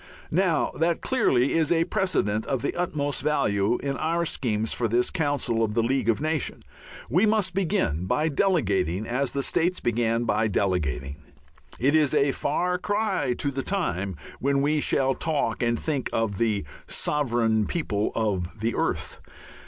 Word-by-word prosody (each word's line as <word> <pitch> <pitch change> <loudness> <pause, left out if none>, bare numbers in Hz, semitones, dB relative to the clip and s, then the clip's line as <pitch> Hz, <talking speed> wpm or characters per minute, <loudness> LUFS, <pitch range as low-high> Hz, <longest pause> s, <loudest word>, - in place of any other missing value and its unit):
Now, 175 -2 +2
that 165 +1 +1
clearly 140 - +2
is 160 -1 +1
a 165 -1 +4
precedent 170 - 0
of 135 -3 -1
the - - -1
utmost 145 -6 -1
value 115 -7 +1
in 140 -1 -2
our 170 +2 0
schemes 110 -7 -1
for 120 - 0
this 120 +3 +1
council 145 -9 0
of 105 -1 -1
the 115 - +2
League 125 -1 0
of 115 - +2
Nations. 155 -1 -2 0.4
We 180 - +3
must 210 -3 +2
begin 175 - 0
by 150 +10 +1
delegating, 105 - +1
as 130 +3 -1
the 140 - -1
States 175 +5 +1
began 115 0 0
by 110 -1 +1
delegating. 75 - -1 0.6
It 135 +5 +2
is 155 -2 +3
a 140 -1 +3
far 180 +7 -1
cry 205 - 0
to 140 - -1
the 135 0 -3
time 100 - -2 0.2
when 140 +1 +1
we 150 +1 +2
shall 135 -2 +2
talk 140 -7 -1
and 120 -1 +1
think 145 -5 -2
of 110 -4 -1
the 110 -7 +1 0.2
Sovereign 115 -7 +1
People 110 -11 -1
of 100 -3 -2
the 115 +2 -1
Earth. - - -2
135 Hz, 160 wpm, -25 LUFS, 110-160 Hz, 0.6 s, a